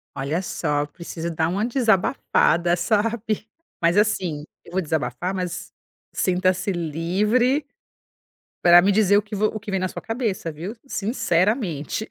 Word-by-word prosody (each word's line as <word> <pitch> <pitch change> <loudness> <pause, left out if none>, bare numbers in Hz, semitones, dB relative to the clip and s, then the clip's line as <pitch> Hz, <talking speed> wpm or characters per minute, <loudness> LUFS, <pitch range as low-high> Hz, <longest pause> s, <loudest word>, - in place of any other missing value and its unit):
Olha 140 +6 -1
só, 145 -5 -1
preciso 170 +2 -6
dar 160 0 +1
uma 200 +6 0
desabafada, 195 -7 +2
sabe, 215 +2 -1 0.3
mas 170 +1 +3
assim, 185 -8 +1 0.2
eu 170 - -14
vou 190 - +1
desabafar, 160 +1 -2
mas 175 -2 -4 0.4
sinta-se 185 +1 +1
livre 200 - +1 1.0
pra 175 0 +8
me 190 +3 +4
dizer 205 -1 +4
o - - +3
que 210 0 -7
vo 210 +1 +1
o 215 - -5
que 210 0 -7
vem 190 - 0
na 185 - 0
sua - - -7
cabeça, 225 -8 -2
viu, 170 +9 -7
sinceramente. 210 - -1
185 Hz, 145 wpm, -23 LUFS, 170-215 Hz, 1.0 s, pra